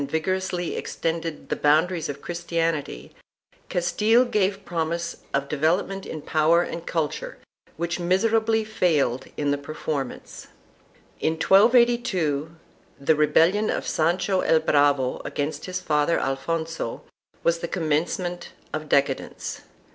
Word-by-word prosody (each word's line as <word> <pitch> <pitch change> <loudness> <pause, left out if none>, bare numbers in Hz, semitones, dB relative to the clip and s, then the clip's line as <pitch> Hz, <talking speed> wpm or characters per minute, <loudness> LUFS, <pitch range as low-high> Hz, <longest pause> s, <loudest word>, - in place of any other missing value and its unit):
I] - - 0
ABASEMENT 140 - -4
OF 185 +4 -1
THE 165 -2 -3
CM 150 +1 +5
OWN 165 +3 +1
3 185 - -6
aries 160 -3 -4
of 140 0 -6
Christianity, 165 - -2 0.6
Castile 210 +8 +3
gave 200 -4 0
promise 170 0 -2
of 140 0 -1
development 175 +7 0
in 155 -2 -6
power 160 +2 +3
and 170 -1 -6
culture 160 -4 -2 0.4
which 170 +2 -2
miserably 220 +5 +2
failed 165 - +1
in 145 -1 0
the 145 - 0
performance. 140 -2 -5 0.7
In 160 - +1
1282 195 - +3 0.5
the 140 +3 +3
rebellion 165 +8 +3
of - - -1
Sancho 185 +4 +1
el 160 -1 +3
Bravo 145 -4 +2
against 145 +2 -3
his 185 0 -3
father 150 -2 +1
Alfonso 160 0 -3 0.4
was 170 0 +2
the 170 - -3
commencement 175 +2 -2 0.2
of 155 -1 -4
decadence. 140 -1 0
165 Hz, 125 wpm, -24 LUFS, 150-185 Hz, 0.7 s, CM